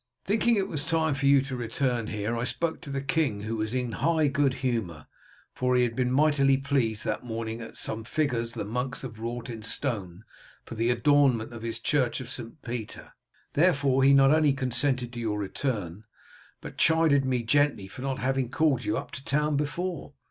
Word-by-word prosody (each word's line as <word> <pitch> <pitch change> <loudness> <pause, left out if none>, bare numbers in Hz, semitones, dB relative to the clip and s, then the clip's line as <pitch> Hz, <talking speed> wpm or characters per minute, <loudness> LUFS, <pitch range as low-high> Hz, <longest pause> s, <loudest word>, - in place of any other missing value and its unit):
Thinking 225 +3 +2
it 195 -2 0
was 150 -3 -2
time 160 -1 +1
for 140 0 0
you 140 -1 +5
to 135 -1 -5
return 120 -1 -1
here, 105 +2 -2
I 115 - -2
spoke 160 +5 -1
to - - -9
the 140 0 -3
king, 140 -8 0
who 110 +2 -3
was 110 0 -2
in 125 -1 -1
high 160 +2 +2
good 140 -1 +1
humour, 95 - -2 0.5
for 125 0 +1
he 125 - +4
had 115 -2 -1
been 125 -1 0
mightily 140 -1 +4
pleased 130 -6 -1
that - - -2
morning 115 -1 -4
at 115 - -10
some 110 - -2
of 110 - -10
the - - -11
figures 120 -7 -1
the - - -3
monks 125 +5 -3
have 115 -4 -7
wrought 120 +2 -4
in 115 -3 -7
stone 105 -6 -3 0.4
for - - -8
the 115 +1 0
adornment 125 -2 +3
of 115 - -8
his 115 0 -3
Church 125 +1 +1
of 125 -2 -7
St. 125 +3 -7
Peter; 120 -3 -6 0.4
therefore 140 -5 +3
he 135 - +6
not 135 0 +6
only 155 -2 +4
consented 130 -1 -1
to 120 - -5
your 110 -3 -1
return, 105 -2 -3 0.6
but - - -9
chided 160 -5 +4
me 130 -2 0
gently 140 -4 +2
for 125 +7 -10
not 135 -1 -2
having 135 -2 -1
called 145 -3 +1
you 160 +1 -1
up - - -6
to 135 - -8
town 150 +2 +1
before. 150 +2 -3
130 Hz, 205 wpm, -27 LUFS, 115-145 Hz, 0.6 s, he